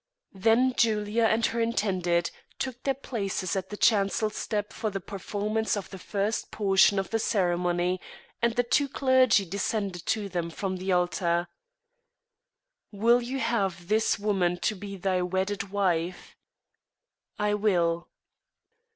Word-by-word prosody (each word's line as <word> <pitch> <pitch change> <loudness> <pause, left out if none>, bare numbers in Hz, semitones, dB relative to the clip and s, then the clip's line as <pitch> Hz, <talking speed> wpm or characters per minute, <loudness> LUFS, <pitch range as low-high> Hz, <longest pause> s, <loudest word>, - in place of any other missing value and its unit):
Then 225 +6 +3
Julia 220 0 +2
and 225 +1 +3
her 235 - -1
intended 185 -6 0 0.3
took 255 -2 -4
their 270 -1 0
places 200 -8 -3
at 190 -1 -3
the 210 - -6
chancel 215 0 +2
step 210 0 -3
for 220 - -2
the 195 -1 -4
performance 210 +3 -2
of 200 - -6
the 190 - -8
first 205 +4 -2
portion 195 -1 +3
of 195 - -2
the 225 - +1
ceremony, 180 -3 0 0.4
and 235 -1 +2
the 245 - +3
two 280 +4 +1
clergy 260 -6 +4
descended 195 -1 -2
to 215 -2 0
them 175 -3 -3
from 185 +2 -3
the 190 +1 -2
altar. 175 -1 +1 1.4
"Wilt 235 +4 +3
thou 260 +3 -3
have 195 -8 -1
this 220 +1 +2
woman 195 -4 +1
to - - +1 0.2
thy 185 0 0
wedded 190 +2 -2
wife?" 180 -3 -1 1.0
"I 210 0 +1
will." 175 -5 +1
200 Hz, 135 wpm, -27 LUFS, 185-220 Hz, 1.4 s, clergy